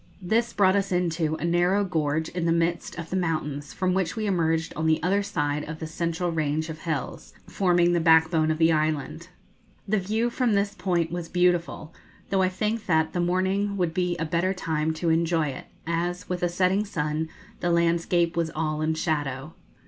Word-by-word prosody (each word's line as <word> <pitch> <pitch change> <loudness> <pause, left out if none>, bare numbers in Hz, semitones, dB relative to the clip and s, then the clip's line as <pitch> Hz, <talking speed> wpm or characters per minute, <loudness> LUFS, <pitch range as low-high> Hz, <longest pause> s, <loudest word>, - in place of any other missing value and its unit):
This, 225 +5 0
brought 190 -1 +3
us 195 -1 0
into 165 -3 0
a 160 - -4
narrow 175 +4 +2
gorge 160 -3 -1
in 175 -1 -3
the 165 - +2
midst 170 0 0
of 165 -1 -7
the - - -1
mountains, 155 -5 -2
from 185 -1 0
which 185 -3 0
we 220 -1 -2
emerged 165 -4 0
on 160 +1 -1
the 160 0 +4
other 195 +3 +2
side 150 -6 -1
of 160 - -5
the 160 - -6
central 170 +2 -2
range 155 0 -1
of 160 0 -6
hills, 160 -5 -4
forming 175 -2 +2
the 170 - +3
backbone 160 -1 +4
of 155 - 0
the 160 0 +4
island. 155 +1 -1 0.6
The 210 +1 +2
view 220 +5 -1
from 240 -2 +1
this 200 0 +1
point 175 -5 -1
was 175 -1 -4
beautiful, 175 -3 0 0.4
though 195 -1 +3
I 185 - +3
think 210 +3 -2
that 160 -2 +2
the 175 - -1
morning 190 +3 0
would 175 -3 0
be 180 0 0
a 165 - -2
better 170 +4 0
time 160 -3 -1
to 165 +1 0
enjoy 165 -1 +1
it, 130 - -7 0.2
as, 175 +3 -2
with 180 -1 -3
a 175 - +1
setting 185 +3 +2
sun, 155 -5 -2 0.3
the 175 - -1
landscape 170 0 +2
was 165 -1 0
all 155 -1 -1
in 160 +1 0
shadow. 145 -3 -2
170 Hz, 195 wpm, -26 LUFS, 160-185 Hz, 0.6 s, the